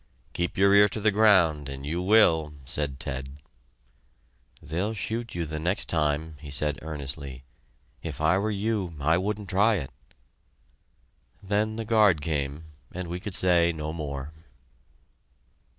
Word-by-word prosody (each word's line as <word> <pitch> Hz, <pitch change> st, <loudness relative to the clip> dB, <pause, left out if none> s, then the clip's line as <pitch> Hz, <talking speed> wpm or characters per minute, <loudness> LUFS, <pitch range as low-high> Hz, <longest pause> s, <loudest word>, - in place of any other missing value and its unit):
"Keep 85 Hz, 0 st, -2 dB
your 100 Hz, +1 st, +5 dB
ear 100 Hz, 0 st, +7 dB
to 110 Hz, -, -4 dB
the 110 Hz, +1 st, +3 dB
ground 90 Hz, -9 st, +4 dB
and 70 Hz, 0 st, -7 dB
you 85 Hz, +4 st, -2 dB
will!" 85 Hz, -7 st, +4 dB
said 75 Hz, -2 st, -3 dB
Ted. 65 Hz, +2 st, -4 dB, 1.2 s
"They'll 95 Hz, +8 st, -3 dB
shoot 115 Hz, +1 st, -4 dB
you 85 Hz, -1 st, -2 dB
the 75 Hz, 0 st, -5 dB
next 90 Hz, +9 st, -1 dB
time," 75 Hz, 0 st, 0 dB
he 75 Hz, 0 st, -10 dB
said 70 Hz, 0 st, -1 dB
earnestly. 70 Hz, -3 st, -6 dB, 0.6 s
"If -, -, -6 dB
I 80 Hz, +5 st, +3 dB
were 105 Hz, +2 st, -1 dB
you, 100 Hz, -4 st, -2 dB
I 80 Hz, +4 st, +2 dB
wouldn't 105 Hz, 0 st, -3 dB
try 105 Hz, +4 st, +3 dB
it." 75 Hz, -9 st, -4 dB, 1.5 s
Then 105 Hz, +2 st, 0 dB
the 115 Hz, 0 st, -4 dB
guard 105 Hz, -7 st, +4 dB
came, 75 Hz, -1 st, -3 dB, 0.3 s
and 90 Hz, -1 st, -6 dB
we 90 Hz, +1 st, -4 dB
could 95 Hz, 0 st, -5 dB
say 85 Hz, -2 st, +3 dB
no 80 Hz, -1 st, -5 dB
more. 75 Hz, -2 st, -5 dB
85 Hz, 145 wpm, -27 LUFS, 75-100 Hz, 1.5 s, ear